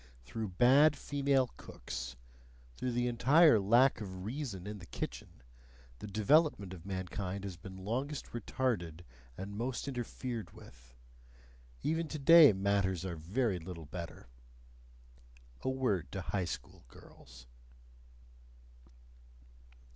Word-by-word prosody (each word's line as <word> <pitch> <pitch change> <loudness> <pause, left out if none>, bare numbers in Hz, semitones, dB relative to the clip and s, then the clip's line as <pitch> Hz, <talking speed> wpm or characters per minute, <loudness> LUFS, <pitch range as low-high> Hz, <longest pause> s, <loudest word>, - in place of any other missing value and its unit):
Through 110 - -4
bad 135 - +5
female 140 -2 +1
cooks 65 +1 -7 0.6
through 125 - -3
the 120 +1 +1
entire 130 +3 +5
lack 120 +6 +4
of 95 -2 -6
reason 115 -6 -5
in 105 0 -6
the 90 - -12
kitchen 60 - -7 0.6
the - - -7
development 110 - +2
of 90 0 -11
mankind 95 +1 -4
has 95 -3 -5
been 95 +2 -10
longest 130 +7 -2
retarded 100 -8 -2 0.4
and 100 +2 -6
most 125 +5 -3
interfered 120 -3 -5
with: 65 - -16 0.9
even 160 +1 0
today 155 0 +7
matters 95 -2 0
are 90 -2 -3
very 95 +5 -1
little 85 -1 -8
better. 85 +3 -8 1.4
A - - -1
word 130 -8 -1
to 95 - -3
High 95 +1 -2
School - - -7
girls. 60 0 -16
105 Hz, 115 wpm, -33 LUFS, 90-130 Hz, 1.4 s, today